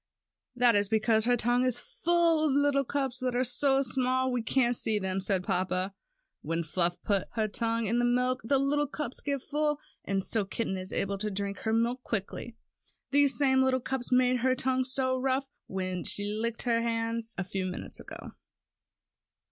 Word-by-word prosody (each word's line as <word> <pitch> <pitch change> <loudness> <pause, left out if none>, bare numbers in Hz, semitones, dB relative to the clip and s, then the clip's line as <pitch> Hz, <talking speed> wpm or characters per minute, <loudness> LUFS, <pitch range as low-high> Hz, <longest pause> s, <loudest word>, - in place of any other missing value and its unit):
"That 245 -1 +4
is 205 -1 +2
because 220 0 +2
her 245 0 +3
tongue 240 +2 +2
is 255 -2 +3
full 345 - +2
of 280 - +1
little 285 0 +3
cups, 270 -1 -2
that 255 -2 -1
are 250 - +2
so 270 +2 +2
small 260 0 +1
we 250 -1 0
can't 245 +1 +2
see 220 -1 +1
them," 190 -1 -2
said 190 -1 0
papa. 185 0 -1 0.5
"When 165 +2 -2
Fluff 175 +2 -1
puts 200 -3 +1
her 220 -2 0
tongue 230 +1 -1
in 230 +4 +1
the 240 - +2
milk, 250 +1 +1
the 275 +5 +2
little 290 +2 +1
cups 280 -2 -5
get 280 -2 -2
full, 295 0 -1 0.2
and 195 -1 -1
so 220 +1 +1
kitty 195 -1 -3
is 185 0 -5
able 200 0 -2
to 210 +1 -1
drink 200 -1 -4
her 220 - -2
milk 235 +3 +1
quickly. 225 +1 -4 0.6
These 285 -1 +4
same 265 -2 +3
little 260 0 +2
cups 260 0 -3
made 250 0 +4
her 255 +1 +2
tongue 260 0 0
so 260 0 +1
rough, 265 +1 0 0.2
when 185 -2 -3
she 205 - +1
licked 230 +2 -2
your 230 -1 +2
hand 230 0 -1 0.2
a 190 - -1
few 190 0 -3
minutes 180 - -6
ago." - - -9
240 Hz, 190 wpm, -29 LUFS, 205-265 Hz, 0.6 s, That